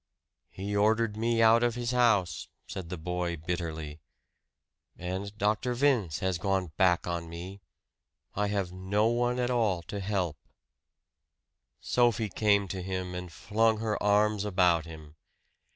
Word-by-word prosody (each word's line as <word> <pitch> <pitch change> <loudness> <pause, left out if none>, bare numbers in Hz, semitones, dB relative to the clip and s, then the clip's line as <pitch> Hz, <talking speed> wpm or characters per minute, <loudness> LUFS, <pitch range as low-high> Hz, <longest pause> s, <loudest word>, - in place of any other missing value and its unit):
"He 100 +2 -5
ordered 110 +1 +2
me 115 +1 +1
out 115 +1 +6
of 120 -1 +1
his 120 -1 -2
house," 105 -10 +2 0.2
said 90 -3 -7
the 90 - -4
boy 90 +1 -3
bitterly. 80 -2 -4 1.0
"And 95 +3 -5
Dr. 110 +4 0
Vince 120 - +1
has 95 -2 0
gone 95 -3 -1
back 90 -3 +3
on 85 -1 -3
me 90 +4 -8 0.7
I 105 +1 0
have 100 -3 -1
no 95 +3 0
one 120 +1 +1
at 125 0 0
all 105 -8 +1
to 100 - -6
help." 95 -6 -1 1.4
Sophie 120 -3 +1
came 100 0 +2
to 95 0 -4
him 95 0 -4
and 90 -1 -6
flung 110 +7 +1
her 110 -1 -2
arms 105 0 +3
about 90 -5 +2
him. 80 -1 -11
100 Hz, 140 wpm, -29 LUFS, 90-110 Hz, 1.4 s, out